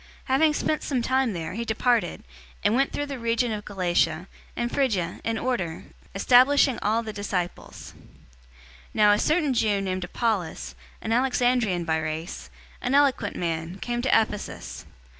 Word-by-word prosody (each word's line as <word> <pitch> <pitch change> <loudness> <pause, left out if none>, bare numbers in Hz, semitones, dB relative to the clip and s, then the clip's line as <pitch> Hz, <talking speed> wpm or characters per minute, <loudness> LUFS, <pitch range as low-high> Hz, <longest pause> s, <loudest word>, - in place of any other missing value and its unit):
018:023 - - -28
Having 300 +4 +4
spent 310 - 0
some 260 -4 -1
time 260 -2 +1
there, 165 -1 -5
he 230 +4 -3
departed, 225 -4 0 0.4
and 210 - +3
went 270 +3 +2
through 290 - -2
the 275 -3 -6
region 230 +1 0
of 210 -1 -4
Galatia, 175 -3 0 0.3
and 240 0 -2
Phrygia, 210 -11 0
in 225 0 -1
order, 195 -10 -2 0.3
establishing 255 +5 +5
all 220 +3 +1
the 215 -1 -6
disciples. 195 -3 -4
018:024 - - -19 0.9
Now 210 -1 +6
a 205 - +3
certain 305 -3 +2
Jew 215 -4 +2
named 185 -1 -2
Apollos, 190 -3 -2 0.3
an 225 - -1
Alexandrian 245 -7 +1
by 160 -1 +1
race, 160 +2 -5 0.3
an 250 +2 0
eloquent 270 -7 +2
man, 165 +1 -3
came 240 +3 -3
to 260 - -1
Ephesus. 130 - -1
220 Hz, 160 wpm, -25 LUFS, 180-250 Hz, 0.9 s, Now